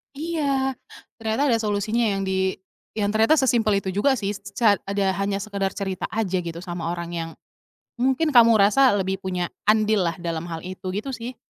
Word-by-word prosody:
Iya, 280 -4 -1 0.5
ternyata 225 +4 0
ada 230 - +2
solusinya 215 +2 0
yang 195 - -2
di 190 0 0 0.4
yang 205 -1 0
ternyata 225 +8 +4
sesimpel 225 -7 +2
itu 190 - -2
juga 235 +9 +2
sih, 205 -4 -2
seca 205 +1 +1
ada 200 0 0
hanya 195 0 -1
sekedar 200 -2 -3
cerita 190 -2 -3
aja 205 -4 -1
gitu 170 0 -6
sama 175 -2 -5
orang 170 0 -4
yang 165 -1 -4 0.7
mungkin 265 +5 +1
kamu 230 -4 +7
rasa 215 +5 +5
lebih 190 -1 -1
punya 180 -2 -3 0.2
andillah 210 -5 +3
dalam 170 0 -3
hal 165 -1 -6
itu, 185 +1 -8
gitu 215 +7 -3
sih. 245 0 -6
205 Hz, 170 wpm, -23 LUFS, 190-230 Hz, 0.7 s, kamu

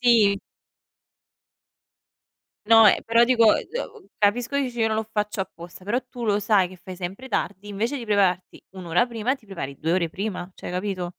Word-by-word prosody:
Sì. 220 -5 +4 2.3
No, 225 -1 +8
ehm, - - +4
però 230 +1 +5
dico, 230 -3 +5
ehm, 460 -4 -6
capisco 235 +6 +1
che 280 - +2
dici: 245 -2 -5
"Io 225 - +3
non 220 - -1
lo 220 0 -3
faccio 210 -1 -2
apposta", 175 0 -8
però 235 +5 0
tu 240 -1 -6
lo 205 -1 +2
sai 200 -3 +2
che 185 - -13
fai 180 +1 -10
sempre 190 +8 -6
tardi, 205 -2 -3
invece 225 +7 -2
di 240 - -6
prepararti 190 -4 0
1 185 - -8
ora 175 +9 +2
prima 235 +2 -1
ti 225 -6 -18
prepari 140 -8 -6
2 160 +2 -1
ore 175 -2 +1
prima, 190 0 -5
cioè - - -8
capito? 185 -1 -3
210 Hz, 190 wpm, -24 LUFS, 185-235 Hz, 2.3 s, No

